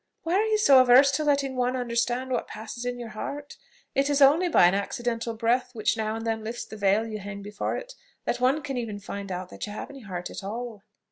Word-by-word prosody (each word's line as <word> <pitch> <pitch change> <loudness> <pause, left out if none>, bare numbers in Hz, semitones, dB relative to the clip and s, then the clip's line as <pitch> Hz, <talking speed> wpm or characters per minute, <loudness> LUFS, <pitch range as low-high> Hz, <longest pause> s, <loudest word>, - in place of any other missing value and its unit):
Why 330 - -1
are 410 +4 +3
you 435 -1 +2
so 275 -11 +7
averse 255 +3 +7
to 295 +2 0
letting 280 -2 +1
one 250 0 0
understand 245 +1 -1
what 245 - -1
passes 230 +2 -7
in 245 0 -2
your 240 -2 -7
heart? 285 +7 -6 0.4
It 275 +1 +2
is 285 -1 +2
only 300 +6 +5
by 250 - +6
an 175 - +5
accidental 230 +3 -2
breath, 245 +2 0
which 215 0 +1
now 220 -1 -2
and 225 0 -5
then 225 -1 -1
lifts 230 +2 -5
the - - -10
veil 205 +1 +2
you 215 -1 -5
hang 200 0 -7
before 205 0 -3
it, - - -8 0.3
that 245 - -1
one 265 +5 +2
can 275 -3 -4
even 225 -4 -3
find 200 -1 -6
out 180 0 -5 0.2
you - - -6
have 210 - -6
any 275 -1 -11
heart 180 -5 -6
at - - -7
all." 225 +1 -5
240 Hz, 240 wpm, -26 LUFS, 215-270 Hz, 0.4 s, so